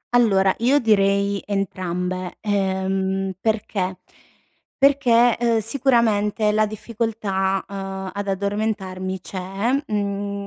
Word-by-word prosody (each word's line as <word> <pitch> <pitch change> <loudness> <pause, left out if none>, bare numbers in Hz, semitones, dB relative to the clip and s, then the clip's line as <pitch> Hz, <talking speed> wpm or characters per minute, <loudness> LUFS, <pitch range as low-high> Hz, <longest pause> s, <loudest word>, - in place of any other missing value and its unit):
Allora, 195 -5 +4
io 255 +5 +4
direi 200 -3 +2
entrambe, 185 -2 -3
ehm, 190 -1 -1
perché? 205 -4 -1 0.8
Perché, 245 -4 +4
uhm, 235 -1 +2
sicuramente 220 -3 +2
la 215 0 +2
difficoltà, 210 -3 -2
uhm, 195 -1 -5
ad 200 0 -4
addormentarmi 195 -2 -2
c’è, 195 +6 -3 0.2
mhmm, 200 -1 -2
200 Hz, 90 wpm, -22 LUFS, 190-220 Hz, 0.8 s, Allora